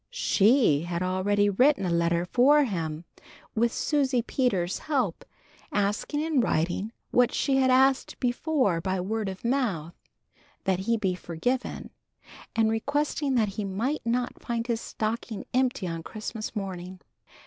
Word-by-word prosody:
She 225 Hz, -, +3 dB
had 175 Hz, 0 st, -2 dB
already 200 Hz, +3 st, +1 dB
written 250 Hz, +3 st, +3 dB
a 175 Hz, -, 0 dB
letter 170 Hz, 0 st, +1 dB
for 280 Hz, +9 st, +5 dB
him, 165 Hz, -, -3 dB, 0.5 s
with 235 Hz, +1 st, +2 dB
Susie 270 Hz, -5 st, +1 dB
Peters's 195 Hz, -10 st, 0 dB
help, 260 Hz, -, -1 dB, 0.5 s
asking 210 Hz, +8 st, 0 dB
in 310 Hz, -4 st, +2 dB
writing 180 Hz, +2 st, 0 dB, 0.2 s
what 245 Hz, -1 st, +4 dB
she 270 Hz, -2 st, +1 dB
had 260 Hz, -1 st, +3 dB
asked 265 Hz, +1 st, +3 dB
before 250 Hz, -, +1 dB
by 190 Hz, +2 st, -1 dB
word 210 Hz, +2 st, -2 dB
of 190 Hz, +4 st, -8 dB
mouth, 215 Hz, -, 0 dB, 0.7 s
that 190 Hz, -2 st, +1 dB
he 230 Hz, +4 st, +1 dB
be 190 Hz, -4 st, 0 dB
forgiven, 180 Hz, +9 st, -3 dB, 0.6 s
and 220 Hz, -1 st, +3 dB
requesting 285 Hz, +4 st, 0 dB
that 220 Hz, -4 st, +2 dB
he 205 Hz, +2 st, -4 dB
might 225 Hz, +10 st, -2 dB
not 245 Hz, +1 st, -1 dB
find 235 Hz, -1 st, -2 dB
his 235 Hz, -2 st, -1 dB
stocking 220 Hz, 0 st, -4 dB
empty 250 Hz, -5 st, +1 dB
on 165 Hz, -2 st, -3 dB
Christmas 215 Hz, +4 st, -6 dB
morning. 185 Hz, -2 st, -5 dB
220 Hz, 140 wpm, -27 LUFS, 185-255 Hz, 0.7 s, for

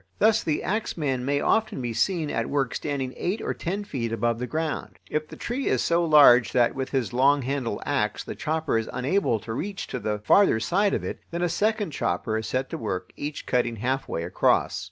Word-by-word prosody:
Thus 220 Hz, +1 st, +4 dB
the 155 Hz, -2 st, -1 dB
axeman 150 Hz, -, -1 dB
may 145 Hz, +1 st, +1 dB
often 220 Hz, -4 st, +1 dB
be 120 Hz, -2 st, -3 dB
seen 165 Hz, -, 0 dB
at 115 Hz, -, -1 dB
work 140 Hz, -3 st, 0 dB
standing 135 Hz, -3 st, -3 dB
eight 190 Hz, +6 st, -1 dB
or -, -, -2 dB
ten 195 Hz, +4 st, -3 dB
feet 125 Hz, -, -3 dB
above 115 Hz, +1 st, 0 dB
the 125 Hz, -, -3 dB
ground. 160 Hz, +2 st, -3 dB
If 155 Hz, 0 st, -1 dB
the -, -, -10 dB
tree 255 Hz, +3 st, -3 dB
is -, -, +2 dB
so 170 Hz, +1 st, +2 dB
large 145 Hz, -7 st, +6 dB
that 120 Hz, -2 st, +3 dB
with 130 Hz, -1 st, -4 dB
his 125 Hz, -8 st, -1 dB
long 140 Hz, +2 st, +4 dB
handled 130 Hz, -5 st, -2 dB
axe 105 Hz, -7 st, -1 dB
the -, -, -6 dB
chopper 155 Hz, -5 st, -1 dB
is 110 Hz, -, -5 dB
unable 130 Hz, -, 0 dB
to 110 Hz, -, -6 dB
reach 195 Hz, -, -4 dB
to 125 Hz, -, -3 dB
the 105 Hz, -2 st, -2 dB
farther 110 Hz, -, +4 dB
side 195 Hz, -, +1 dB
of -, -, -3 dB
it, -, -, -5 dB
then 170 Hz, +1 st, -3 dB
a 175 Hz, -, +1 dB
second 210 Hz, +1 st, 0 dB
chopper 115 Hz, -4 st, -1 dB
is 110 Hz, 0 st, -2 dB
set 130 Hz, +1 st, -1 dB
to -, -, -4 dB
work, 95 Hz, -5 st, -4 dB
each 145 Hz, +1 st, -5 dB
cutting 120 Hz, -2 st, 0 dB
halfway 125 Hz, -6 st, -2 dB
across. 90 Hz, -, +1 dB
140 Hz, 215 wpm, -25 LUFS, 120-170 Hz, -, large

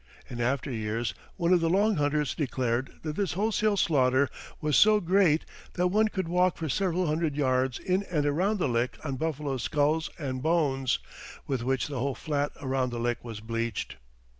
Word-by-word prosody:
In 120 Hz, -1 st, -5 dB
after 135 Hz, +3 st, 0 dB
years 110 Hz, 0 st, -2 dB, 0.2 s
one 175 Hz, 0 st, +2 dB
of 180 Hz, -, +5 dB
the 165 Hz, -, +2 dB
Long 205 Hz, +3 st, +3 dB
Hunters 145 Hz, -1 st, +1 dB
declared 130 Hz, -3 st, -1 dB
that 155 Hz, -1 st, -3 dB
this 195 Hz, -4 st, -1 dB
wholesale 215 Hz, +1 st, +1 dB
slaughter 135 Hz, -5 st, +3 dB, 0.3 s
was 150 Hz, -2 st, 0 dB
so 215 Hz, 0 st, +6 dB
great 180 Hz, -4 st, +3 dB, 0.3 s
"that 180 Hz, 0 st, +1 dB
one 215 Hz, +3 st, +3 dB
could 190 Hz, -5 st, -3 dB
walk 180 Hz, +1 st, +2 dB
for 160 Hz, -, -3 dB
several 180 Hz, +4 st, 0 dB
hundred 155 Hz, -1 st, 0 dB
yards 130 Hz, -3 st, +1 dB
in 185 Hz, +1 st, 0 dB
and 150 Hz, -4 st, 0 dB
around 180 Hz, +9 st, +1 dB
the 180 Hz, -, 0 dB
lick 120 Hz, +1 st, 0 dB
on 140 Hz, -4 st, -3 dB
buffaloes' 145 Hz, -4 st, -2 dB
skulls 150 Hz, +5 st, +1 dB
and 130 Hz, -4 st, -4 dB
bones, 140 Hz, -5 st, +1 dB, 0.5 s
with 130 Hz, -4 st, -2 dB
which 130 Hz, +1 st, 0 dB
the 140 Hz, -3 st, -4 dB
whole 135 Hz, +1 st, -1 dB
flat 145 Hz, -2 st, -1 dB
around 130 Hz, -2 st, 0 dB
the 120 Hz, -1 st, -4 dB
lick 120 Hz, 0 st, -1 dB
was 115 Hz, -3 st, -7 dB
bleached." 115 Hz, -, -3 dB
145 Hz, 185 wpm, -28 LUFS, 130-175 Hz, 0.5 s, so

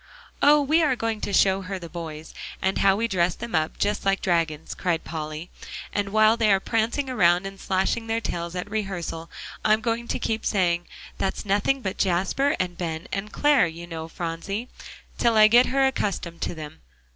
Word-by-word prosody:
"Oh! 295 Hz, 0 st, +6 dB
we 310 Hz, +4 st, +3 dB
are 290 Hz, -5 st, +3 dB
going 225 Hz, -2 st, -2 dB
to -, -, -3 dB
show 195 Hz, 0 st, +3 dB
her 190 Hz, +1 st, -5 dB
the 175 Hz, -2 st, -8 dB
boys, 160 Hz, -2 st, -8 dB, 0.3 s
and 190 Hz, -, 0 dB
how 195 Hz, -1 st, +4 dB
we 230 Hz, +3 st, 0 dB
dress 180 Hz, -4 st, +1 dB
them 235 Hz, 0 st, -7 dB
up 155 Hz, -1 st, 0 dB
just 205 Hz, +1 st, 0 dB
like 195 Hz, 0 st, +2 dB
dragons," 165 Hz, -3 st, -1 dB
cried 170 Hz, -3 st, -1 dB
Polly, 155 Hz, +1 st, -6 dB, 0.4 s
"and 200 Hz, 0 st, -1 dB
while 215 Hz, +2 st, +5 dB
they 220 Hz, -3 st, +3 dB
are 195 Hz, -, +4 dB
prancing 230 Hz, +7 st, 0 dB
around 180 Hz, -7 st, +3 dB
and 195 Hz, 0 st, -7 dB
slashing 195 Hz, +5 st, 0 dB
their 225 Hz, 0 st, 0 dB
tails 170 Hz, -5 st, -4 dB
at 180 Hz, +2 st, -3 dB
rehearsal, 180 Hz, -6 st, -4 dB, 0.3 s
I'm 215 Hz, 0 st, +4 dB
going 230 Hz, +1 st, -2 dB
to -, -, -1 dB
keep 225 Hz, 0 st, -2 dB
saying, 175 Hz, -3 st, +1 dB, 0.3 s
'That's 190 Hz, -, -2 dB
nothing 205 Hz, +7 st, +1 dB
but 190 Hz, -1 st, -3 dB
Jasper 195 Hz, +10 st, +1 dB
and 180 Hz, -1 st, -2 dB
Ben 165 Hz, -2 st, -4 dB
and 195 Hz, +2 st, -3 dB
Clare, 290 Hz, -9 st, +4 dB
you 170 Hz, +1 st, -8 dB
know, 165 Hz, -2 st, -6 dB
Phronsie,' 175 Hz, +8 st, -4 dB, 0.5 s
till 230 Hz, -2 st, +3 dB
I 215 Hz, 0 st, +9 dB
get 240 Hz, +3 st, +6 dB
her 270 Hz, +1 st, +2 dB
accustomed 195 Hz, -9 st, -2 dB
to -, -, -2 dB
them. 155 Hz, -2 st, -9 dB
195 Hz, 190 wpm, -25 LUFS, 170-225 Hz, 0.5 s, I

